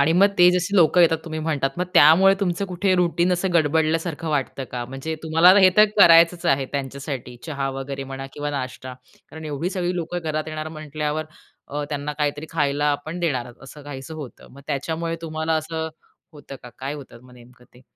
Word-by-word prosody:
आणि 145 +3 +3
मग 195 +4 +5
ते 175 0 +7
जशी 180 +2 -1
लोकं 175 +1 +5
येतात 165 -2 +4
तुम्ही 160 -2 -5
म्हणतात, 145 -4 -1
मग 180 - 0
त्यामुळे 180 +6 +7
तुमचं 180 0 -1
कुठे 185 +1 0
रुटीन 175 0 +1
असं 180 +2 0
गडबडल्यासारखं 160 +1 +1
वाटतं 135 -2 -2
का? 120 -1 -3
म्हणजे 135 +5 -5
तुम्हाला 165 +3 +5
हे 185 -2 +7
तर 210 - +8
करायचंच 170 -1 +6
आहे 135 -4 +2
त्यांच्यासाठी, 135 -2 -5
चहा 140 -3 -3
वगैरे 135 0 -5
म्हणा 135 0 -7
किंवा 145 0 -4
नाष्टा. 130 -2 -5 0.4
कारण 160 +1 -10
एवढी 155 +4 -3
सगळी 180 -2 -2
लोकं 175 +1 -3
घरात 155 -1 -3
येणार 155 0 -5
म्हटंल्यावर, 155 0 -4 0.4
अ, 145 +1 -3
त्यांना 150 0 -4
काहीतरी 150 +1 -2
खायला 145 -2 0
आपण 155 +4 -5
देणार 135 -8 -1
आहोत, 120 +1 -15
असं 145 +2 -12
काहीचं 145 +1 -8
होतं. 145 -5 -10
मग 140 - -14
त्याच्यामुळे 165 +4 -3
तुम्हाला 160 0 -2
असं 160 0 -4 0.4
होतं 140 -2 -11
का? 125 - -11
काय 135 +2 -4
होतं 140 -5 -11
मग 125 - -17
नेमकं 125 0 -18
ते? 125 - -17
155 Hz, 190 wpm, -22 LUFS, 140-165 Hz, 0.4 s, तर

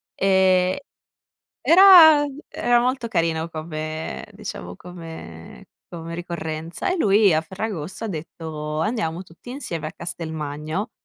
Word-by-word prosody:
Ehm, 190 -1 +3 0.9
era 335 -5 +8 0.2
era 240 0 +2
molto 250 -1 -1
carino 165 -4 0
come 155 - -5
diciamo 90 0 -8
come 160 - -11 0.2
come 165 -1 -7
ricorrenza; 165 - -4
e - - -1
lui 205 - +4
a 155 - +3
Ferragosto 190 +1 -5
ha - - -3
detto: 155 -3 -6
"Andiamo 185 -4 -2
tutti 170 +8 -14
insieme 170 - -5
a - - -11
Castelmagno 160 +3 -5
170 Hz, 115 wpm, -22 LUFS, 155-210 Hz, 0.9 s, era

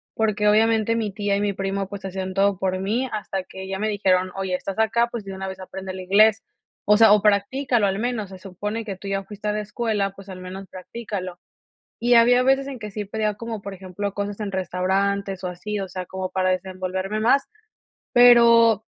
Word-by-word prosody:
porque 215 -1 +1
obviamente 225 +1 +3
mi 220 -3 -1
tía 205 -1 0
y 200 - 0
mi 205 -1 0
primo, 195 0 -2
pues, 200 0 -8
hacían 190 0 -4
todo 200 0 +2
por 185 0 -1
mí 220 +7 -1
hasta 195 -3 -3
que 190 +1 -9
ya 190 0 -4
me 215 - 0
dijeron: 185 -3 +1
"Oye, 190 -1 -2
estás 195 +3 -5
acá, 230 +2 +3
pues, 235 -3 -5
de 195 -1 -7
una 190 0 -5
vez 190 0 -7
aprende 190 0 -7
el 185 - -7
inglés, 205 +4 +4 0.4
o 210 0 +5
sea, 220 -1 +7
o 210 - +4
practícalo 215 +4 +2
al 195 +1 -1
menos, 230 -4 -2
se 190 -1 -11
supone 205 +4 -5
que 200 -3 -4
tú 195 +2 -10
ya 195 0 -1
fuiste 210 +1 -8
a - - +2
la 210 - -1
escuela, 210 -1 -1
pues, 195 0 -13
al 185 -1 -8
menos 190 +1 -8
practícalo". 185 -2 -7 0.6
Y 240 +1 +3
había 245 +2 +6
veces 270 +1 +2
en 275 -2 -6
que 210 -2 -7
sí 210 +1 -4
pedía 210 +1 -2
como, 225 0 -6
por 200 -1 -6
ejemplo, 190 +2 -5
cosas 205 +1 -4
en 210 -2 -3
restaurantes 190 +1 -1
o - - -1
así, 195 +4 -5
o 195 - -4
sea, 185 0 -6
como 190 0 -5
para 185 -1 +1
desenvolverme 185 +2 -3
más. 255 +5 +3 0.7
Pero, 235 -2 +6
200 Hz, 215 wpm, -23 LUFS, 190-220 Hz, 0.7 s, sea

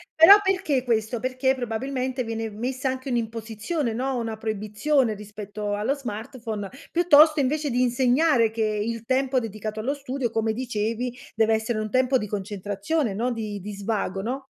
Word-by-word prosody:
Però, 325 +6 +10
perché 370 -9 +1
questo? 230 -1 0
Perché, 255 +2 +1
probabilmente 255 +2 -2
viene 225 -1 -3
v - - -13
messa 255 +4 -2
anche 260 +1 -4
un'imposizione, 230 +3 -2
no, 260 +2 -1
una 225 -2 -3
proibizione 220 +4 0
rispetto 205 0 -6
allo 215 +7 0
smartphone, 225 -4 -5 0.2
piuttosto 315 -3 +6
invece 290 +2 0
di 250 +1 +1
insegnare 250 0 +3
che 225 - -3
il 215 +2 -1
tempo 260 +1 +2
dedicato 215 -1 -5
allo 265 +6 -1
studio, 270 -3 -3
come 220 0 0
dicevi, 235 +1 -2 0.2
deve 220 0 +3
essere 220 0 -1
un 215 - -3
tempo 255 +1 +3
di 210 - -4
concentrazione, 205 - -2
no 245 +4 0
di 215 -3 -4
di 205 +2 -6
svago, 195 -1 -2
no? 265 +5 -4
235 Hz, 160 wpm, -25 LUFS, 215-260 Hz, 0.2 s, Però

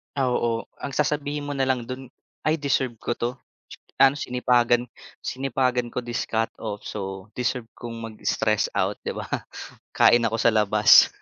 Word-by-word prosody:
Ah, 135 -2 +1
oo. 115 -2 0
Ang 140 - -6
sasabihin 150 0 0
mo - - -2
nalang 130 -2 +1
dun, 130 +1 -5 0.4
"Ay, 155 - +3
deserve 135 -5 0
ko 120 - -2
'to. 120 +1 -1 0.7
Sana 135 0 +6
sinipagan 125 -2 +2 0.4
sinipagan 130 -2 0
ko 125 - -1
this 120 0 -3
cut 115 0 +1
off. 105 -2 -4
So, 95 0 -6
deserve 125 -1 -1
kong 115 -1 -7 0.2
mag-stress 105 -1 +1
out, 95 +2 +1
'di - - -3
ba? - - -4 0.7
Kain 120 0 +6
ako 115 0 0
sa 115 - +3
labas." 105 0 +6
120 Hz, 155 wpm, -25 LUFS, 115-130 Hz, 0.7 s, Sana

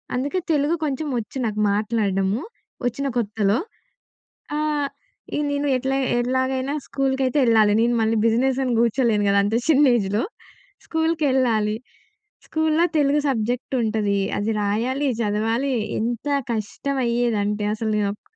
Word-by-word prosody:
అందుకే 285 +9 -1
తెలుగు 295 +3 +2
కొంచెం 295 +2 -2
వచ్చు, 230 +4 -7
నాకు 215 -1 -2
మాట్లాడడము, 205 0 0 0.4
వచ్చిన 275 +4 -1
కొత్తలో. 210 0 +1 1.0
ఆహ్, 300 -2 0 0.5
ఇది 295 - 0
నేను 285 0 -1
ఎట్లా 270 +1 -1 0.2
ఎట్లాగైనా 260 +2 0
స్కూల్‌కయితే 270 0 0
యెళ్ళాలి 220 -3 +4
నేను. 240 +1 +2
మళ్ళీ 220 +1 +1
బిజినెసని 255 +2 +1
కూర్చోలేను 230 -3 +2
కదా! 200 - +3
అంత 205 +2 -1
చిన్న 295 -2 +5
ఏజ్‌లో 205 0 0 0.6
స్కూల్‌కెళ్ళాలి. 265 -10 +1 0.7
స్కూల్‌లో 315 +1 +1
తెలుగు 290 0 +3
సబ్జెక్ట్ 245 +1 -1
ఉంటది. 215 -2 0 0.2
అది 205 +2 -1
రాయాలి, 245 +8 0
చదవాలీ, 225 +5 0 0.2
ఎంత 235 +4 -2 0.3
కష్టం 225 +6 -3
అయ్యేదంటే 215 -3 0
అసలు 220 0 -2
నేను 205 -1 +1
ఒక్ - - -26
240 Hz, 120 wpm, -22 LUFS, 215-275 Hz, 1.0 s, చిన్న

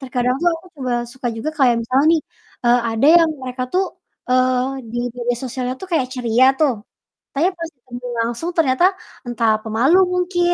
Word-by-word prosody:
terkadang 250 -1 -1
tuh 350 - +4
aku 330 +3 -11
juga 255 -2 -2 0.2
suka 260 -1 -6
juga 225 +7 -3
kayak 250 -3 +5
misalnya 260 +6 +2
nih, 325 - +2 0.4
eee, 240 +1 +4
ada 225 +5 +1
yang 325 -1 +3
mereka 255 0 -4
tuh, 380 +1 +2 0.5
eee, 255 0 +1
di 240 - -6 0.2
media 245 0 -1
sosialnya 255 0 -3
tuh 380 - -8
kayak 265 -6 +2
ceria 245 0 +2
tuh, 295 -5 +3 0.6
tapi 290 +5 +1
pas 335 -1 -5
ketemu 250 0 -10
langsung 235 +9 -2
ternyata 295 +2 +3 0.4
entah 230 -2 0
pemalu 240 - +3 0.2
mungkin, 350 -1 +1
255 Hz, 170 wpm, -19 LUFS, 245-315 Hz, 0.6 s, kayak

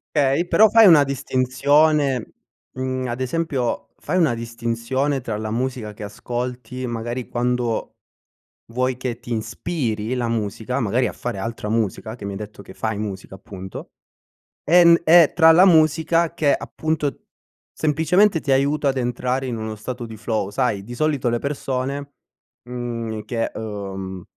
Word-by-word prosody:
Okay, 140 +5 +2
però 215 +4 +6
fai 225 0 +7
una 160 -6 +7
distinzione, 140 +1 +1 0.4
mhmm, 130 0 -3
ad 120 +1 -4
esempio, 145 +4 -2
fai - - -2
una 155 -8 +3
distinzione 115 +4 -2
tra 115 -3 -4
la 110 0 -4
musica, 120 -2 -3
che 105 0 -9
ascolti, 125 +3 -5
magari 120 +1 -4
quando 120 -1 -1 0.8
vuoi 130 +1 0
che 125 -2 -4
ti 120 - -11
inspiri 115 0 -2
la 120 -2 -1
musica, 110 +2 -2
magari 120 +3 +1
a - - -6
fare 120 -4 -5
altra 115 0 -4
musica 110 0 -2
che 115 - -10
mi 100 - -4
hai 95 - -6
detto 105 -1 -9
che 95 - -13
fai 110 -2 -3
musica, 95 -2 -6
appunto, 95 -1 -9 0.7
en 170 +1 +6
e 165 -1 +7
tra 165 -1 +7
la 175 +3 +7
musica 165 0 +3
che, 150 -4 +2
appunto, 155 -2 -3 0.5
semplicemente 160 +5 +2
ti 140 - -1
aiuta 140 +2 +2
ad 135 -1 0
entrare 125 +2 -1
in 120 -3 -3
uno 110 0 -4
stato 120 +3 -6
di 110 - -9
flow. 110 -2 -2
Sai, 105 -3 -1
di 120 +4 -8
solito 145 -2 0
le 120 - 0
persone, 140 0 -3 0.5
mhmm, 115 -3 -5
che, 115 0 -2
uhm, 95 -3 -6
125 Hz, 155 wpm, -22 LUFS, 110-145 Hz, 0.8 s, fai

